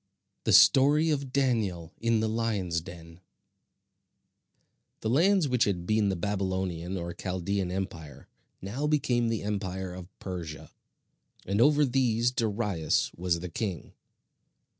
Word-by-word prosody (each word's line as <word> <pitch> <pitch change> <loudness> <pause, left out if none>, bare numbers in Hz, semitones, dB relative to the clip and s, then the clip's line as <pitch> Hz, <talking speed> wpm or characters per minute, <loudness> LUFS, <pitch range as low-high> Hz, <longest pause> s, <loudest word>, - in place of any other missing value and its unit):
THE - - +2
STORY 150 +4 +6
OF 140 -3 -2
DANIEL 110 - 0
IN 115 -1 +1
THE 110 - +1
LIONS' 105 -7 -1
DEN 85 0 -12 1.8
The 110 - -1
lands 175 +4 +4
which 125 -2 +2
had 90 -4 -2
been 110 0 +2
the 95 - 0
Babylonian 95 -2 -2
or 85 -1 -5
Chaldean 95 +1 -2
empire, 85 -7 -6 0.4
now 125 +10 -2
became 125 -6 +1
the 115 -2 -2
empire 95 -3 -3
of 90 -1 -9
Persia; 85 -5 -7 0.7
and 100 +4 0
over 150 +2 +5
these 120 -2 +1
Darius 105 -9 0
was 85 -1 -1
the 90 - -5
king. 90 - -4
100 Hz, 125 wpm, -28 LUFS, 90-120 Hz, 1.8 s, STORY